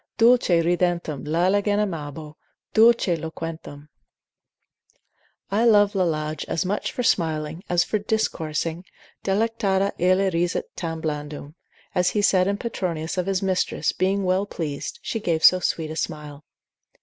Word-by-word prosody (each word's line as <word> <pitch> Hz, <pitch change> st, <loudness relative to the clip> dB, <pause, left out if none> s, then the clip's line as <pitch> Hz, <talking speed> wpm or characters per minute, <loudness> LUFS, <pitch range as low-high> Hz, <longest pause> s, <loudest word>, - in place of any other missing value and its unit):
Dulce 240 Hz, 0 st, +4 dB
ridentem 170 Hz, -4 st, -1 dB
Lalagen 195 Hz, +6 st, +2 dB
amabo, 155 Hz, -6 st, -4 dB, 0.4 s
Dulce 225 Hz, -5 st, +5 dB
loquentem, 160 Hz, -2 st, -7 dB, 1.6 s
I 210 Hz, +3 st, +2 dB
love 205 Hz, -3 st, +5 dB
Lalage 155 Hz, -5 st, -1 dB
as 165 Hz, -, -1 dB
much 200 Hz, +3 st, -2 dB
for 250 Hz, -, -3 dB
smiling, 160 Hz, -3 st, 0 dB
as 175 Hz, 0 st, +3 dB
for 215 Hz, -, -1 dB
discoursing, 165 Hz, -6 st, -2 dB, 0.4 s
delectata 200 Hz, -1 st, +1 dB
illa 185 Hz, +2 st, +3 dB
risit 175 Hz, +1 st, 0 dB
tam 165 Hz, -2 st, -4 dB
blandum, 150 Hz, -1 st, -5 dB, 0.4 s
as 180 Hz, 0 st, +2 dB
he 210 Hz, -, -1 dB
said 185 Hz, -2 st, +4 dB
in 200 Hz, 0 st, 0 dB
Petronius 180 Hz, -7 st, -3 dB
of 180 Hz, -, -2 dB
his 195 Hz, -1 st, 0 dB
mistress, 185 Hz, -1 st, 0 dB
being 195 Hz, +2 st, 0 dB
well 185 Hz, +2 st, +1 dB
pleased, 155 Hz, -, -5 dB
she 225 Hz, -, -3 dB
gave 165 Hz, -6 st, -1 dB
so 185 Hz, -, +7 dB
sweet 160 Hz, -3 st, -2 dB
a -, -, -5 dB
smile. 150 Hz, -2 st, -5 dB
180 Hz, 135 wpm, -24 LUFS, 160-200 Hz, 1.6 s, so